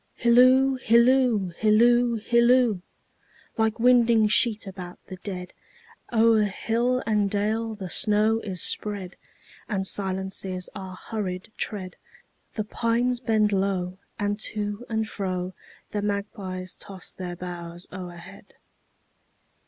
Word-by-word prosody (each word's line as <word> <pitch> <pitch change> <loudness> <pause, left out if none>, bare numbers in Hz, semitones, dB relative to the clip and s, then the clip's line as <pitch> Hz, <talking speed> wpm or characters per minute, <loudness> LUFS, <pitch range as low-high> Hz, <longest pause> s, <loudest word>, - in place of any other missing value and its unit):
Hilloo, 255 +3 +5
hilloo, 235 -4 +4
hilloo, 235 +2 +4
hilloo! 235 -2 +3 0.7
Like 220 0 0
winding 235 -3 +4
sheet 220 -1 +4
about 180 -2 -8
the 185 - -9
dead, 180 -1 -7 0.6
O'er 225 -1 +4
hill 235 +5 0
and 210 -2 +1
dale 215 +2 -1
the 195 -3 -6
snow 215 +4 +2
is 190 -5 -3
spread, 200 -4 -2 0.5
And 195 -3 -1
silences 190 -1 -1
our 190 -1 -7
hurried 190 -1 -5
tread; 185 -4 -4 0.6
The 215 - -1
pines 235 +3 0
bend 215 -3 +2
low, 190 -2 -1 0.2
and 205 +1 -1
to 210 +2 -3
and 220 -1 0
froThe 185 -3 -4 0.5
magpies 200 -3 -4
toss 195 -2 -8
their 180 -1 -6
boughs 175 -1 -7
o'erhead. 175 -2 -10
210 Hz, 110 wpm, -25 LUFS, 185-230 Hz, 0.7 s, Hilloo